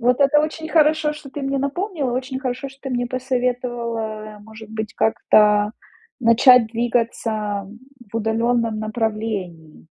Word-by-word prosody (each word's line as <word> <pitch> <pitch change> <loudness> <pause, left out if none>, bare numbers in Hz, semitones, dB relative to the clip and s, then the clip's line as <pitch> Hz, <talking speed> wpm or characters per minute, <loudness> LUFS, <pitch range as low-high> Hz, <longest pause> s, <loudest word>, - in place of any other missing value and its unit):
Вот 250 +3 +2
это 280 +2 +5
очень 315 +1 -3
хорошо, 310 -1 +3
что 300 -3 -11
ты 290 - -6
мне 275 0 -1
напомнила, 285 - -2
очень 260 +1 -3
хорошо, 255 +1 -3
что 270 - -17
ты 270 - -5
мне 245 -1 -1
посоветовала, 240 -4 -3
может 220 0 -12
быть, 220 -1 -5
как-то 210 -1 +3 0.5
начать 230 0 +6
двигаться 225 -3 -1 0.5
в - - -2
удалённом 230 0 0
направлении. 215 -8 -4
240 Hz, 130 wpm, -21 LUFS, 220-265 Hz, 0.5 s, начать